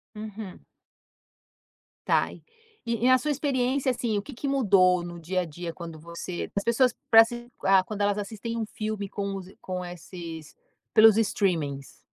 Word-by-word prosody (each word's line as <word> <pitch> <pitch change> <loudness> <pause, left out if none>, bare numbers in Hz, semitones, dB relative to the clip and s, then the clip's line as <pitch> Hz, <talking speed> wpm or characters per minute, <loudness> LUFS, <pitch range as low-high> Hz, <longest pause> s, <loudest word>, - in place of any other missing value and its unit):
Uhum. 210 -2 -7 1.5
Tá, - - +2
e - - -14 0.4
e 235 0 0
e - - +5
na 255 0 +7
sua 300 +4 -3
experiência, 265 -1 +1
assim, 230 -4 -1
o - - 0
que 280 - -10
que 255 +4 -5
mudou 190 -9 +4
no 175 0 -7
dia 185 +3 -1
a 180 - -3
dia 165 +2 -6
quando 165 -2 -8
você 170 +2 -6
as 200 - 0
pessoas 240 +1 +3 0.2
pra 225 0 +10
se 240 +1 -8 0.2
ah, 190 -1 +5
quando 205 +1 -5
elas 205 0 +2
assistem 220 +3 -4
um 225 - -1
filme 215 -1 -4
com 200 -1 -3
os 190 -1 -8
com 185 -1 -4
esses 170 -2 -9 0.4
pelos 220 0 +7
streamings? 165 -10 -1
200 Hz, 175 wpm, -27 LUFS, 180-230 Hz, 1.5 s, pra